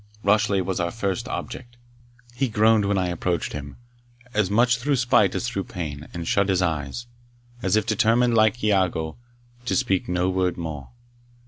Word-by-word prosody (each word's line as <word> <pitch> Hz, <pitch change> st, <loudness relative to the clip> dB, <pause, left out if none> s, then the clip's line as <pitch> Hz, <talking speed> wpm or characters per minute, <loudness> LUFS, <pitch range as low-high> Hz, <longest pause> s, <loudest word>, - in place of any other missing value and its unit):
Rashleigh 100 Hz, -1 st, +3 dB
was 95 Hz, 0 st, -2 dB
our 85 Hz, 0 st, 0 dB
first 105 Hz, +4 st, -3 dB
object. 120 Hz, -2 st, -6 dB, 0.6 s
He 130 Hz, +1 st, -1 dB
groaned 110 Hz, -1 st, +3 dB
when 100 Hz, 0 st, +1 dB
I 90 Hz, -1 st, 0 dB
approached 85 Hz, -1 st, -2 dB
him, 70 Hz, -1 st, -7 dB, 0.6 s
as 105 Hz, -3 st, +1 dB
much 120 Hz, +4 st, +3 dB
through 140 Hz, +3 st, +1 dB
spite 120 Hz, -6 st, +3 dB
as 120 Hz, -, -1 dB
through 100 Hz, -6 st, -3 dB
pain, 75 Hz, -4 st, -6 dB
and 85 Hz, -1 st, -6 dB
shut 100 Hz, 0 st, +2 dB
his 95 Hz, -1 st, +2 dB
eyes, 80 Hz, -, -2 dB, 0.6 s
as 95 Hz, -2 st, +1 dB
if 110 Hz, -1 st, +2 dB
determined, 115 Hz, +2 st, +3 dB
like 110 Hz, +1 st, +3 dB
Iago, 90 Hz, -6 st, +1 dB, 0.5 s
to -, -, 0 dB
speak 100 Hz, -10 st, 0 dB
no 90 Hz, 0 st, +1 dB
word 95 Hz, -1 st, 0 dB
more. 80 Hz, -5 st, -6 dB
100 Hz, 165 wpm, -24 LUFS, 90-115 Hz, 0.6 s, Rashleigh